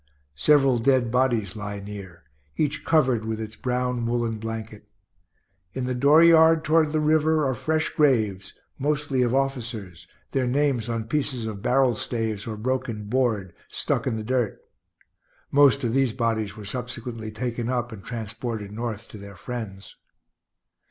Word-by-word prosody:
Several 135 -5 +4
dead 125 -1 +2
bodies 120 -6 +1
lie 105 -1 -5
near, 100 -4 -9 0.3
each 145 -1 -1
covered 130 -8 +3
with 110 0 -3
its 110 0 -6
brown 125 -1 -1
woollen 115 -2 -1
blanket. 110 -1 -7 0.8
In 130 -1 -3
the 125 - -1
dooryard, 160 +4 +6
toward 155 -1 +3
the 155 - +1
river, 155 0 +3
are 130 - +1
fresh 155 +6 0
graves, 110 - +1 0.2
mostly 145 -2 0
of 125 +1 +2
officers, 115 - -3 0.2
their 130 -2 0
names 130 -3 +1
on 115 -1 -1
pieces 125 -1 -2
of 105 -3 -5
barrel 125 +1 +3
staves 110 -2 -3
or 110 -2 -4
broken 125 -1 -2
board, 110 -7 0
stuck - - -1
in - - 0
the 110 - -4
dirt. 120 -2 0 0.9
(Most 140 -1 +5
of 115 -2 0
these 135 -3 +2
bodies 110 -4 -1
were 105 - -8
subsequently 120 0 -5
taken 120 +1 -3
up 125 -1 -1
and 105 -3 -9
transported 115 -2 -5
North 115 0 -5
to 105 - -10
their 100 0 -10
friends.) 100 -2 -7
120 Hz, 150 wpm, -25 LUFS, 110-135 Hz, 0.9 s, dooryard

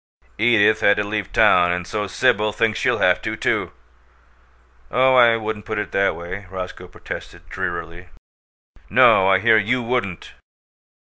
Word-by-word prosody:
"Edith 110 -1 +3
had 100 - +3
to 105 - 0
leave 105 -1 -4
town, 90 -5 +3
and 90 0 -3
so 105 +3 -4
Sibyl 105 +3 0
thinks 110 0 -1
she'll - - 0
have - - +2
to, - - -4
too!" - - -2 1.2
"Oh, 130 +2 +2
I 120 -2 +5
wouldn't 110 -1 -6
put 110 - -5
it 105 - -4
that 100 0 0
way," 90 +3 -8
Roscoe 90 -1 -8
protested, 90 - -10
drearily. 85 -1 -6 0.8
"No, 95 - +5
I 95 -1 +4
hear 110 +3 +3
YOU 120 +4 -1
wouldn't!" 115 -8 -4
105 Hz, 150 wpm, -20 LUFS, 90-110 Hz, 1.2 s, I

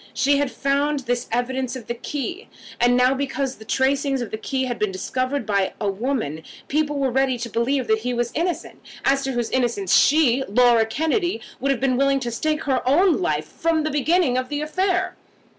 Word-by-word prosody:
She 280 +2 +3
had 285 -1 0
found 280 +3 0
this 245 -1 -2
evidence 250 +2 -1
of 250 -4 -8
the 235 - -3
key, 295 - -5 0.3
and 245 +1 +4
now 250 +1 +4
because 270 -1 -2
the 220 - -13
tracings 270 +3 +1
of 240 -4 -5
a - - -1
key 265 +4 -2
had 245 -2 -3
been 210 -2 0
discovered 255 +8 -2
by 200 -3 0
a 205 -2 0
woman, 195 - -2 0.3
people 295 0 0
were 270 -2 0
ready 265 0 +1
to 235 0 -5
believe 255 +4 0
that 220 -1 +2
he 250 +3 -3
was 240 -1 -1
innocent, 345 +2 -3 0.3
as 275 0 +2
to 270 - -1
whose 240 -2 -2
innocence 235 -7 0
she, 275 -4 +4
Laura 235 +1 +4
Kennedy, 320 - 0 0.2
would 275 - -1
have 270 -3 +1
been 255 -2 +1
willing 275 0 +2
to 240 -2 -3
stake 305 +6 -1
her 265 -2 +1
own 355 +6 +4
life 350 - 0
from 325 -1 -1
the 310 - -1
beginning 295 -2 +2
of 255 0 -5
the 290 0 -2
affair! 370 +4 0
265 Hz, 205 wpm, -22 LUFS, 240-285 Hz, 0.3 s, and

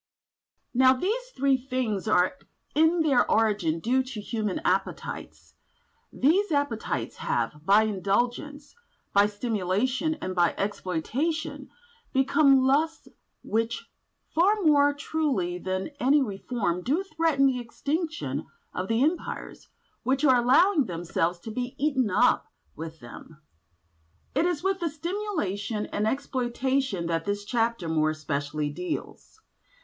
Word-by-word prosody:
Now 260 +1 +6
these 440 - -2
three 270 0 +3
things 245 -6 -2
are 185 +2 +3 0.4
in 320 +3 +4
their 280 -6 +3
origin 205 -8 +2
due 250 +8 +2
to 255 -4 -6
human 210 -2 -2
appetites; 190 +1 -3 0.6
these 360 +8 +2
appetites 225 - -1
have, 120 +6 -2
by 200 +5 +5
indulgence, 240 +9 -1 0.4
by 200 +1 +5
stimulation, 225 - -1
and 185 -11 -5
by 175 -2 +2
exploitation, 210 - -2 0.4
become 270 0 +4
lusts 310 +4 +1 0.3
which, 225 +1 -2 0.4
far 375 +6 +4
more 290 -2 +5
truly 285 - -1
than 185 - -3
any 280 +2 +4
reform, 200 -4 -2
do 295 - 0
threaten 320 -6 +1
the 260 -2 +2
extinction 280 - -3 0.3
of 185 - -3
the 225 +4 +2
Empires 325 +4 -3 0.3
which 265 +4 +1
are 260 -3 +6
allowing 295 +5 +4
themselves 175 -1 -1
to 225 - -7
be 250 +3 -4
eaten 265 -5 +1
up 185 - +3 0.3
with 160 0 -8
them. 135 +6 -12 0.9
It 305 +6 +2
is 350 -2 -2
with 385 0 +1
the 340 -2 -1
stimulation 295 - -3
and 210 +1 -1
exploitation 260 -5 -1
that 165 -1 -1
this 205 0 -2
chapter 230 -5 0
more 155 -1 +2
especially 150 -1 -2
deals. 180 - -6
245 Hz, 125 wpm, -27 LUFS, 190-290 Hz, 0.9 s, Now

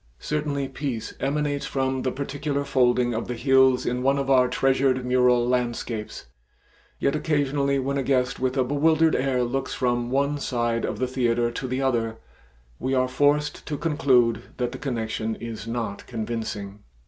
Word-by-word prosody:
Certainly 145 -2 -2
peace 120 -7 -4
emanates 145 0 -1
from 130 -1 -1
the 130 - -1
particular 140 +1 -3
folding 125 -3 +2
of 115 - -3
the 125 - -3
hills 130 0 +4
in 125 +1 -1
one 135 +2 +2
of 135 0 -1
our 130 -1 +5
treasured 130 0 +1
mural 125 -1 +3
landscapes, 120 -3 -2 0.7
yet 140 - +1
occasionally 145 -2 +1
when 140 +1 -1
a - - +1
guest 125 -2 0
with 130 +1 -1
a 130 - +4
bewildered 155 +4 +3
air 130 -1 +1
looks 135 +3 -2
from 120 -1 0
one 140 +2 0
side 120 -3 -1
of - - -3
the 130 - 0
theater 120 -2 +1
to 130 +2 -4
the 130 +2 -2
other, 115 -4 0 0.6
we 130 +1 -1
are 130 0 +2
forced 145 +3 +1
to 150 - -2
conclude 135 -7 +2 0.2
that 125 -1 -1
the 130 - -7
connection 110 -4 -2
is 115 -2 -7
not 115 -4 -4
convincing. 110 -3 -4
130 Hz, 165 wpm, -25 LUFS, 120-140 Hz, 0.7 s, our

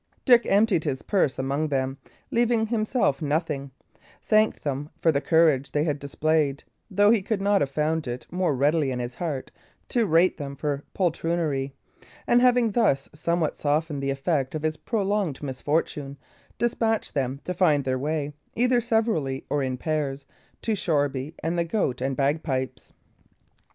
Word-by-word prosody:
Dick 245 -3 +6
emptied 200 -5 +3
his 135 -4 -2
purse 185 -10 +1
among 140 +4 -1
them, 135 -2 -1 0.4
leaving 235 -1 +2
himself 215 - 0
nothing; 150 -2 -1 0.5
thanked 215 0 +2
them 145 0 -3
for 165 - +3
the 140 -2 0
courage 155 -5 +3
they 150 - +2
had 150 -3 -1
displayed, 145 0 0 0.3
though 205 +1 +4
he 225 -3 +3
could 210 +1 -1
have 200 -7 +2
found 155 +1 -1
it 120 +1 -5
more 180 -4 0
readily 145 +2 +2
in 130 - -2
his 125 0 -4
heart 145 -3 -4 0.4
to 235 -3 +1
rate 170 +3 +4
them 140 -3 -6
for 145 0 -2
poltroonery; 165 -6 0 0.5
and 240 0 +4
having 245 -2 +4
thus 195 - +1
somewhat 165 +1 -1
softened 150 0 -1
the 135 - -1
effect 135 0 -1
of 155 - -4
his 155 0 0
prolonged 200 - -1
misfortune, 140 +1 -2 0.4
despatched 225 -1 0
them 135 -1 -1
to 180 - -3
find 155 -6 +3
their 130 -1 0
way, 150 +1 -2 0.2
either 245 +1 +3
severally 220 - 0
or 145 - +1
in 130 -1 -2
pairs, 145 -2 -2 0.4
to 225 - +1
Shoreby 145 -5 -1
and 170 +2 0
the - - +3
Goat 160 - -1
and 135 +1 -1
Bagpipes. 135 -2 -1
155 Hz, 155 wpm, -25 LUFS, 140-195 Hz, 0.5 s, Dick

